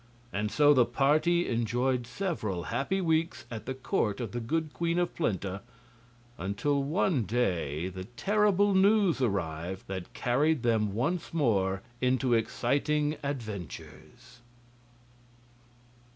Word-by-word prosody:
And 105 +1 -1
so 145 +5 +5
the 130 -3 +5
party 155 +7 +2
enjoyed 120 +2 0
several 120 - -3
happy 165 +11 0
weeks 160 -4 0
at 115 0 -7
the 130 - -3
court 110 -5 -1
of 115 -5 -4
the 120 - -3
good 155 +6 -2
Queen 170 0 -1
of 175 0 0
Plenta, 100 - -2 0.8
until 140 +10 0
one 150 0 +1
day 90 - -1
the 95 0 -7
terrible 205 - +2
news 195 -4 +4
arrived 95 -4 -2
that 95 -2 -6
carried 140 +3 +1
them 110 -4 +1
once 165 +8 -2
more 95 -10 +1 0.2
into 130 0 +2
exciting 145 +6 +1
adventures. 115 - -7
125 Hz, 120 wpm, -29 LUFS, 105-160 Hz, 0.8 s, so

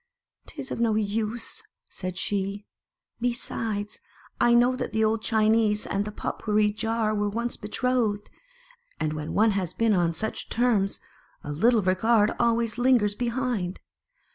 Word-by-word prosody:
" - - -55
'Tis 285 -4 -7
of - - -3
no 230 -2 +2
use," 220 +2 -2 0.3
said 185 -1 -5
she. 200 +1 -2 0.3
" - - -44
Besides, 225 -3 -3 0.4
I 240 0 +5
know 245 +2 +4
that 255 - -4
the 220 0 +2
old 220 0 +1
Chinese 215 -1 +2
and 200 +1 -1
the 210 - -5
Pot - - -4
pourri 210 -1 +2
Jar 225 0 0
were 205 -1 0
once 235 +3 -2
betrothed; 215 -1 -1 0.7
and 155 -1 -1
when 150 0 -5
one 220 +1 +4
has 190 -4 -2
been 225 -2 +3
once 175 - +3
on 165 - -2
such 220 +6 -3
terms, 225 -5 +1 0.4
a 145 - -5
little 220 +8 +3
regard 210 +4 +3
always 235 0 +1
lingers 240 -5 +3
behind. 235 -5 -2
215 Hz, 160 wpm, -26 LUFS, 205-235 Hz, 0.7 s, I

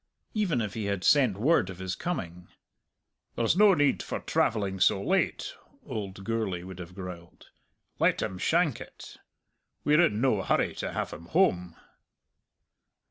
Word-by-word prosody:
Even 190 - 0
if 105 -3 -3
he 110 -2 -4
had 100 -2 -2
sent 130 -9 +4
word 125 - +2
of 95 - -8
his 95 -1 -4
coming, 90 - -5 0.9
"There's 115 +6 +2
no 205 0 +6
need 145 -2 +2
for - - -4
travelling 100 -4 0
so 95 - +4
late," 190 - 0 0.3
old 100 - -6
Gourlay 105 -5 -2
would 95 0 -9
have 90 0 -9
growled; 90 -3 -10 0.5
"let - - +3
him 95 - -4
shank 165 - +1
it. - - -11 0.7
We're 150 +3 +4
in 110 -12 +2
no 120 -6 +2
hurry - - +1
to - - -3
have - - -3
him 85 +2 -10
home." 90 - +1
105 Hz, 150 wpm, -28 LUFS, 90-145 Hz, 0.9 s, no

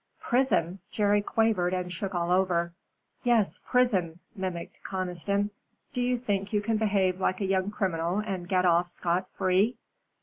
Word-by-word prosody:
"Prison?" 240 -8 +1
Jerry 205 -1 +2
quavered 205 -5 +1
and 180 -1 -3
shook 195 +1 -4
all 175 0 0
over. 175 -2 +2 0.5
"Yes, 235 -5 +2
prison," 195 -10 +2 0.2
mimicked 185 -3 -5
Conniston. 190 +2 -2 0.4
"Do 250 - -1
you 250 0 +1
think 205 -4 -2
you 210 - +2
can 220 +1 0
behave 195 -4 +1
like 185 0 +1
a 200 - -1
young 190 0 +1
criminal 180 -4 -1
and 195 -4 -3
get 185 -1 +2
off 175 0 +4
scot 175 +1 -1
free?" 190 +5 +1
190 Hz, 155 wpm, -28 LUFS, 180-210 Hz, 0.5 s, off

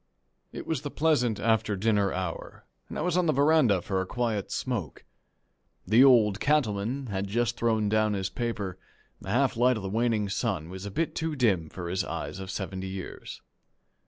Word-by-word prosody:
It - - -7
was 160 -5 -2
the 145 - -4
pleasant 130 -9 +1
after 110 -2 +1
dinner 100 -1 +1
hour, 90 -2 -5 0.2
and - - -6
I - - -2
was 175 0 0
on 180 -1 +2
the - - +4
veranda 140 - +4
for 95 -2 -1
a 95 - -4
quiet 115 -4 -2
smoke. 100 - -3 0.8
The 110 +7 +6
Old 110 -7 +5
Cattleman 130 -3 0
had 100 0 -2
just 120 +3 0
thrown 110 -3 +1
down 110 0 +2
his 95 -2 -1
paper; 100 -5 -4 0.4
the - - -8
half 125 +5 +2
light 125 +1 +3
of 105 - -6
the 95 - -3
waning 110 -1 +1
sun 95 -4 -2
was 95 +2 -7
a - - -4
bit 160 +11 -1
too 160 -1 -2
dim 95 - +1
for 90 +1 -6
his 95 +2 -1
eyes 80 -1 -5
of 95 -1 -7
seventy 95 0 -4
years. 95 0 -7
110 Hz, 190 wpm, -28 LUFS, 95-125 Hz, 0.8 s, The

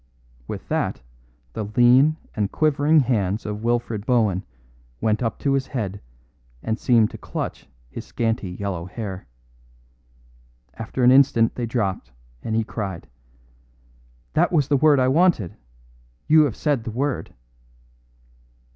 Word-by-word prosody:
With - - -7
that - - -1 0.5
the 110 - -4
lean 130 +6 +5 0.2
and 105 -2 -1
quivering 155 0 +3
hands 105 -5 -1
of 105 0 -4
Wilfred 120 -3 -1
Bohun 110 -6 +1 0.6
went 110 +1 0
up 115 -2 -1
to 140 - +1
his 135 -1 0
head 100 -6 -4 0.6
and 110 +1 -2
seemed 115 -3 +3
to - - -9
clutch - - -6 0.2
his - - -8
scanty 115 -4 -2
yellow 90 -2 -4
hair. 95 - -7 1.5
After 115 +3 -4
an 125 - +7
instant 130 -4 +4
they 120 -2 -3
dropped, 100 - -2 0.3
and 110 - -3
he 115 - +2
cried: 100 -5 -5 1.3
"That - - +2
was 150 -6 +2
the 145 - +4
word 150 0 +4
I 130 - +3
wanted; 145 - +2 0.7
you 155 0 +6
have 130 - -3
said 145 -6 0
the 115 - -5
word." 130 - -3
115 Hz, 135 wpm, -23 LUFS, 105-135 Hz, 1.5 s, an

